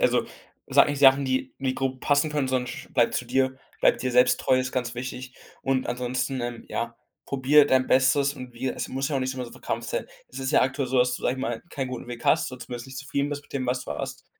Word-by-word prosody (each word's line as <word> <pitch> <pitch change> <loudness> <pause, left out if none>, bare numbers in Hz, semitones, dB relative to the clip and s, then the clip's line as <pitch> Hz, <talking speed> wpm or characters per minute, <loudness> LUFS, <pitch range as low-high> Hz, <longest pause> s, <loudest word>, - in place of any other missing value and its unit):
also - - +3 0.4
sag - - +6
nicht 145 -1 -2
Sachen, 135 0 +7
die 130 0 -1
die 130 -1 -1
grob 130 -1 -2
passen 145 +2 +2
können, 145 -3 0
sondern 130 -1 0
sch - - -8
bleibt 120 -2 +3
zu 125 - -1
dir. 130 +1 0 0.2
Bleibe - - +5
dir 130 -1 -2
selbst 125 0 +5
treu 130 - +3
ist, 130 0 -3
ganz 125 -2 -2
wichtig. 125 +1 -6 0.3
Und 135 -1 0
ansonsten, 125 +2 -2
ähm, 120 -1 -5
ja, 115 0 -3 0.3
probiere 140 +2 +5
dein 130 -2 +3
Bestes 135 +2 +3
und 125 -2 -9
wie 130 +3 -2
es - - -3
muss 135 +2 -2
ja 145 - 0
auch 135 - 0
nicht 130 0 -2
immer 130 - -4
so 120 - -10
verkrampft - - -4
sein. - - -2 0.2
Es - - -9
ist 135 0 -2
ja - - +5
aktuell 135 +1 0
so, 130 0 +1
dass 125 0 +3
du, - - -13
sage 125 - +1
ich 130 - -7
mal 120 -3 -2
keinen 135 -2 -3
guten 125 -1 -6
Weg 120 0 -8
hast, 150 -4 +3
oder 125 - -9
zumindest 120 0 -7
nicht 130 0 -8
zufrieden 140 0 -2
bist 145 -1 -4
mit - - -20
dem, 130 -2 -2
was 125 +1 -1
du - - -8
hast. 75 - -5
130 Hz, 265 wpm, -26 LUFS, 125-135 Hz, 0.4 s, Sachen